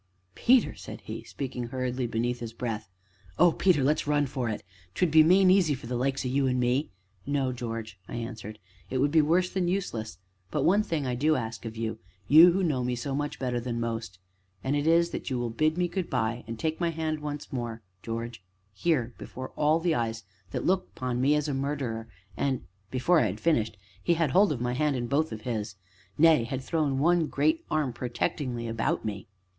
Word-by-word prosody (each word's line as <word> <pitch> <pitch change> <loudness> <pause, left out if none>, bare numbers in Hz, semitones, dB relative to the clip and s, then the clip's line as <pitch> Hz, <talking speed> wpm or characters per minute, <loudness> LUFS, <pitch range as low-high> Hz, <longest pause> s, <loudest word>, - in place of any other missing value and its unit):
"Peter," 250 - +4
said - - -9
he, - - -7
speaking 125 -3 -5
hurriedly 125 0 -2
beneath 120 +2 -1
his 115 -1 -6
breath, 115 -4 -4 0.5
"Oh, 175 0 +6
Peter! 170 -5 +3
let's 145 +2 +1
run 145 -1 +3
for 130 -3 -2
it 105 0 -4 0.3
'twould 180 -4 +2
be 160 0 +8
main 185 +4 +6
easy 180 -6 +4
for 130 - -11
the 125 +1 -3
likes 135 +2 0
o' - - +1
you 135 +1 +1
an' 125 0 +1
me 125 +4 +1 0.2
" 100 0 -40
"No, 140 -2 +1
George," 115 -4 -5
I - - -6
answered; 110 -2 -6 0.3
"it 130 - -1
would 140 +3 +2
be 160 0 +6
worse 175 +4 +2
than 185 -2 0
useless. 115 - -2 0.3
But 150 -3 -1
one 200 +7 +4
thing 160 -8 -2
I 125 - -1
do 150 +5 +2
ask 115 -2 -4
of 110 0 -5
you 115 0 -3 0.3
you 165 +4 +9
who 190 +2 0
know 140 -7 +1
me 125 0 0
so 130 +3 -4
much 145 +1 -2
better 125 -2 -1
than 120 -1 -3
most 115 -4 -3 0.5
and 135 +2 0
it 145 +1 0
is, 170 +1 +4
that - - -4
you 130 - -1
will 120 -1 -2
bid 155 +7 +1
me 180 0 +2
good 180 0 -3
by, 115 +2 -1
and 115 0 -5
take 160 +5 -2
my 170 -1 +1
hand 160 -1 -2
once 150 -1 -6
more, 115 -3 -4 0.2
George 115 -3 -5 0.3
here 125 - 0
before 130 0 -7
all 155 +2 +2
these 170 0 +1
eyes 115 -3 -2 0.3
that - - -3
look 185 +1 +2
upon 125 -1 -1
me 145 +3 +4
as 150 0 0
a 145 - -1
murderer, 135 -5 -2 0.3
and 135 -3 -1
" 100 0 -40
Before 145 +7 +3
I 115 - +3
had 105 +2 -4
finished 115 -10 +1 0.2
he 170 - +2
had 160 -5 +1
my 145 - +3
hand 150 +2 +1
in 120 -1 -2
both 145 +5 +1
of 110 -1 -6
his 110 -3 -3 0.4
nay, 160 -5 +6
had 130 +3 -4
thrown 150 -3 0
one 165 +3 +3
great 155 +3 +1
arm 150 -5 0
protectingly 120 0 -2
about 115 0 -1
me. 100 -3 -4
130 Hz, 215 wpm, -28 LUFS, 115-155 Hz, 0.5 s, you